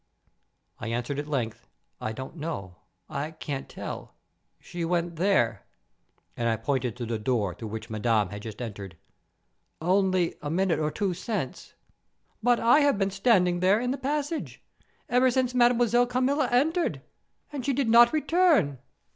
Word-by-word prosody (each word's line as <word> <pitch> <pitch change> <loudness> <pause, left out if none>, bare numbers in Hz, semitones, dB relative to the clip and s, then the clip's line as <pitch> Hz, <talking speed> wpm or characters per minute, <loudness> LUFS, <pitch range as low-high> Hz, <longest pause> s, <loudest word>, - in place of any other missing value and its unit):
I 115 - -5
answered 120 +5 -2
at 145 - -4
length, 115 -6 -3 0.3
"I 110 - -2
don't 130 +7 -7
know—I 145 - -6
can't 145 -3 -6
tell—she 175 -1 -9
went 170 0 -1
there," 180 - +1 0.7
and 115 -1 0
I 115 - +1
pointed 125 0 -2
to 120 - -4
the 115 -1 -3
door 105 -5 0
through 110 - -8
which 110 +2 -7
Madame 110 -2 +1
had 105 0 -7
just 110 +2 -7
entered; 100 -6 -7 0.8
"only 185 0 +2
a 145 - -4
minute 180 +1 +1
or 155 -1 0
two 195 +3 -1
since." 185 - -5 0.7
"But 245 +1 +3
I 240 +6 +5
have 285 -6 +3
been 195 -1 0
standing 190 -4 +3
there, 190 +4 +4
in 250 +1 -1
the 270 - -2
passage, 295 +3 -3 0.4
ever 250 +1 +4
since 255 0 0
Mademoiselle 240 0 +4
Carmilla 260 +2 +1
entered; 320 +8 +1 0.5
and 275 -3 -4
she 280 - +1
did 270 -1 0
not 235 +1 +7
return." 310 - +2
175 Hz, 150 wpm, -27 LUFS, -, 0.8 s, not